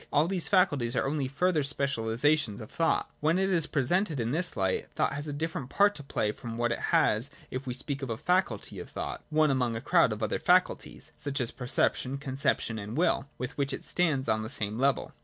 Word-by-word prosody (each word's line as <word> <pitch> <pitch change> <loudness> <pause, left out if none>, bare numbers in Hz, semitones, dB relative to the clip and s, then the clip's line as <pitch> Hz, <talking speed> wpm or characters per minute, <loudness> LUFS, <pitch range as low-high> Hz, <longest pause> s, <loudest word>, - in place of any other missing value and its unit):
All 150 +3 +3
these 185 -2 0
faculties 145 -11 +2
are - - +1
only 140 -1 -1
further 160 +4 +1
specialisations 140 -3 +1
of 110 - -9
thought. 165 -1 +1
When 160 +4 +2
it 190 +1 +1
is 170 -4 +2
presajted 155 +3 +1
in 115 0 -1
this 175 +5 0
light, 95 -1 0
thought - - +1
has 145 +2 -4
a - - -3
different 145 -3 -4
part 205 +5 +4
to 150 - -8
play 120 -6 -1
froiji 115 +1 -7
what 120 0 0
it - - -1
has 110 +6 +3 0.2
if 130 +1 -5
we 125 - -2
speak 140 +2 -4
of 135 - -4
a 115 - -2
faculty 180 - 0
of - - -7
thought, - - -5
one 155 -1 +3
ationg 125 -3 0
a - - -2
crowd - - +4
of - - -4
other - - 0
faculties, - - +1
such 140 0 -2
as 120 -3 0
perception, 125 +1 +1
conception 130 -5 0
and 105 +5 -6
will, 155 -5 +2
with 125 +1 -5
which 140 0 0
it - - -6
stands 150 -7 +1
on 110 0 +1
the 110 - -5
same 110 -3 -3
level. 140 +1 +1
140 Hz, 220 wpm, -29 LUFS, 120-155 Hz, 0.2 s, part